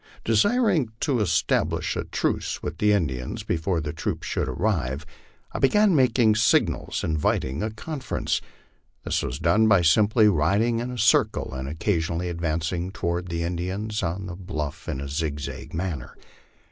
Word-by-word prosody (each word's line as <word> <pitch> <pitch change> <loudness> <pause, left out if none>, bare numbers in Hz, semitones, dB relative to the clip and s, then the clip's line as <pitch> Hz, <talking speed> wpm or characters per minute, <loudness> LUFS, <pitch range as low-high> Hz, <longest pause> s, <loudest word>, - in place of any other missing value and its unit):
Desiring 155 - +2
to 135 -5 +1
establish 105 - +1
a - - -3
truce - - -2
with - - -5
the 105 0 +4
Indians 65 -11 -1
before 85 +1 -1
the 75 -2 -4
troops 80 - -3
should - - -1
arrive, 75 - -1 0.5
I - - -4
began 210 +6 +4
making 120 -5 +4
signals 115 +1 +2
inviting 75 -2 0
a 110 - -1
conference. 135 +5 -3 0.6
This - - 0
was 65 - -3
'done 110 +8 +3
by 100 -5 +5
simply 105 +6 +5
riding 105 +7 +2
in 120 +1 -3
a 125 - -5
circle, 110 - +2
and 65 +1 -4
occasionally 85 0 -1
advancing 85 +1 -2
toward 90 -3 -2
the 85 -1 -2
Indians 95 +5 -3
on 90 +4 -2
the 90 -2 -6
bluff 85 -6 -5
in 65 - -3
a 70 - -5
zigzag 75 -1 -4
manner. 80 -6 -4
90 Hz, 150 wpm, -25 LUFS, 80-110 Hz, 0.6 s, by